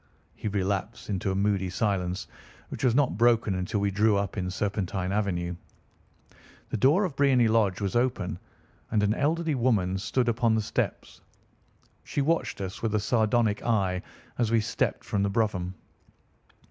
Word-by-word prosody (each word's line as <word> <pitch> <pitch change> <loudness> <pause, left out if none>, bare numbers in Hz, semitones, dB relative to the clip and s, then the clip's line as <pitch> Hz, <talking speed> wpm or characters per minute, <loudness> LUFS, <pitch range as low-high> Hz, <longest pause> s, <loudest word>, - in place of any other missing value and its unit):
He - - -6
relapsed 100 +2 -2
into 95 0 -1
a 95 - 0
moody 100 -1 +1
silence, 95 -2 -1 0.4
which - - -6
was 125 -3 +3
not 130 -8 +2
broken 115 -3 +3
until 95 +3 -2
we 100 0 +1
drew 105 +1 +3
up 100 -2 -2
in 90 -3 -2
Serpentine 95 -1 -2
Avenue. 90 -4 -1 1.2
The - - 0
door 145 - +4
of 165 -7 -4
Briony 135 -4 +4
Lodge 110 -4 +2
was 100 0 -2
open, 120 -7 0 0.5
and 105 -2 +1
an 105 +1 +3
elderly 160 +5 0
woman 105 -8 +1
stood 120 +7 0
upon 115 -1 +2
the 110 - +1
steps. - - -3 0.8
She - - -3
watched 165 -7 0
us 95 0 -5
with 110 -2 0
a - - +3
sardonic 110 -1 +1
eye 95 -6 +1 0.4
as 120 -3 +2
we 115 0 +3
stepped 105 - -1
from 100 - -1
the 100 - +1
brougham. 95 -4 -1
105 Hz, 160 wpm, -27 LUFS, 95-120 Hz, 1.2 s, door